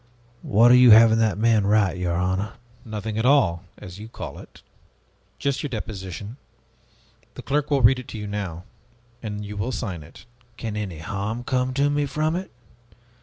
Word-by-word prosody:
What 115 Hz, +4 st, +4 dB
are -, -, +8 dB
you 125 Hz, -1 st, +7 dB
having 110 Hz, 0 st, +7 dB
that 110 Hz, -4 st, +1 dB
man 110 Hz, -2 st, +2 dB
write, 100 Hz, -3 st, +2 dB
your 90 Hz, -1 st, -1 dB
honor?" 95 Hz, +4 st, -1 dB, 0.3 s
"Nothing 110 Hz, 0 st, -4 dB
at 110 Hz, -, 0 dB
all, 95 Hz, -12 st, +3 dB
as 90 Hz, +2 st, -10 dB
you 110 Hz, -, -8 dB
call -, -, -8 dB
it. -, -, -15 dB, 0.7 s
Just 140 Hz, -1 st, -1 dB
your 145 Hz, -, -3 dB
deposition. 105 Hz, -2 st, -6 dB, 1.0 s
The 130 Hz, -, -9 dB
clerk 145 Hz, +1 st, -1 dB
will 140 Hz, -3 st, +2 dB
read 125 Hz, +3 st, +5 dB
it 130 Hz, -, -10 dB
to -, -, -7 dB
you 105 Hz, -, -5 dB
now, 100 Hz, -5 st, -5 dB, 0.6 s
and 105 Hz, -2 st, -5 dB
you 105 Hz, +1 st, -7 dB
will 105 Hz, +5 st, -2 dB
sign 95 Hz, -10 st, -4 dB
it." 75 Hz, +9 st, -15 dB, 0.3 s
"Can 110 Hz, -3 st, -5 dB
any 100 Hz, -6 st, -4 dB
harm 100 Hz, +8 st, -4 dB
come 125 Hz, +1 st, 0 dB
to 145 Hz, +1 st, +2 dB
me 145 Hz, 0 st, 0 dB
from 155 Hz, +3 st, -1 dB
it? 185 Hz, +2 st, -4 dB
110 Hz, 180 wpm, -23 LUFS, 100-125 Hz, 1.0 s, are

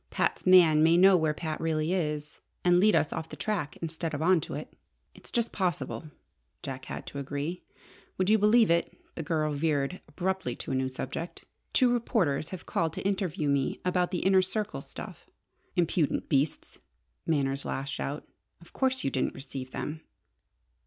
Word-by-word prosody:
"Pat's -, -, -1 dB
man 170 Hz, -5 st, +7 dB
may 165 Hz, +2 st, +5 dB
know 190 Hz, +1 st, +7 dB
where 160 Hz, -3 st, +2 dB
Pat 155 Hz, 0 st, -4 dB
really 160 Hz, +1 st, 0 dB
is, 150 Hz, -4 st, -2 dB, 0.2 s
and 175 Hz, 0 st, +5 dB
lead 210 Hz, 0 st, +5 dB
us 155 Hz, -2 st, +2 dB
off 160 Hz, -, -5 dB
the -, -, -7 dB
track, 185 Hz, -9 st, -2 dB
instead 160 Hz, -1 st, -3 dB
of 145 Hz, -, -4 dB
on 180 Hz, -1 st, +4 dB
to -, -, -6 dB
it." -, -, -7 dB, 0.4 s
"It's -, -, -14 dB
just 235 Hz, -1 st, 0 dB
possible," 170 Hz, -5 st, -2 dB, 0.6 s
Jack 130 Hz, -1 st, -6 dB
had -, -, -6 dB
to 140 Hz, -, -6 dB
agree. 145 Hz, +5 st, -4 dB, 0.6 s
"Would 185 Hz, -, +1 dB
you 215 Hz, +1 st, +5 dB
believe 210 Hz, -1 st, +5 dB
it," 170 Hz, 0 st, +1 dB, 0.2 s
the -, -, -5 dB
girl 155 Hz, -1 st, 0 dB
veered 145 Hz, +2 st, 0 dB
abruptly 190 Hz, -9 st, -2 dB
to -, -, -6 dB
a -, -, 0 dB
new 130 Hz, 0 st, 0 dB
subject, 165 Hz, +6 st, -6 dB, 0.3 s
"two 250 Hz, -2 st, +4 dB
reporters 185 Hz, -, 0 dB
have 185 Hz, -, -8 dB
called 165 Hz, -1 st, 0 dB
to -, -, -5 dB
interview 190 Hz, -5 st, -1 dB
me 140 Hz, -2 st, +1 dB
about 180 Hz, -1 st, +2 dB
the 180 Hz, -, -2 dB
Inner 190 Hz, 0 st, +6 dB
Circle 210 Hz, +3 st, -3 dB
stuff?" -, -, -10 dB, 0.5 s
"Impudent 170 Hz, -4 st, +1 dB
beasts!" 140 Hz, +2 st, 0 dB, 0.5 s
Manners 140 Hz, -3 st, +1 dB
lashed 135 Hz, +1 st, -3 dB
out. 145 Hz, +2 st, -4 dB, 0.3 s
"Of 170 Hz, -, -18 dB
course 260 Hz, -1 st, +1 dB
you 135 Hz, -, 0 dB
didn't 130 Hz, -, -1 dB
receive 135 Hz, -1 st, -7 dB
them?" 155 Hz, +4 st, -5 dB
165 Hz, 175 wpm, -29 LUFS, 145-185 Hz, 0.6 s, man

